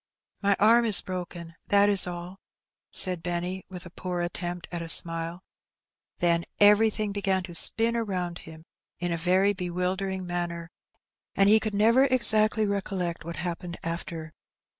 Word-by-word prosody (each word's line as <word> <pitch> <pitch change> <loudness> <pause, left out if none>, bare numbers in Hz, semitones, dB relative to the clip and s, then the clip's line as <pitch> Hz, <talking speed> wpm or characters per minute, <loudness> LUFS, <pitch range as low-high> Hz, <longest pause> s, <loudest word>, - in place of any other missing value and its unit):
"My 200 -1 +2
arm 230 +3 +4
is 215 -4 +6
broken, 175 -2 -8
that 200 0 +3
is 200 -3 +6
all," 175 +2 -8 0.5
said 180 -3 +4
Benny, 175 +2 -4
with 180 -1 -9
a 175 - -12
poor 180 0 -5
attempt 175 0 -5
at 175 -1 -5
a 165 - -7
smile; 165 +2 +2 0.7
then 170 -1 +1 0.2
everything 210 0 +3
began 195 -2 -1
to 175 -1 -10
spin 225 +7 +5
around 185 -6 -4
him 160 0 -13 0.3
in 175 0 -4
a - - -1
very 185 +4 +1
bewildering 185 +1 -3
manner, 175 -1 -5 0.6
and 195 0 +3
he 220 +1 +5
could 215 -1 -5
never 230 +6 +3
exactly 220 -4 +1
recollect 190 -4 -4
what 170 +1 -7
happened 175 +2 -6
after. 165 -1 -6
180 Hz, 150 wpm, -26 LUFS, 175-205 Hz, 0.7 s, is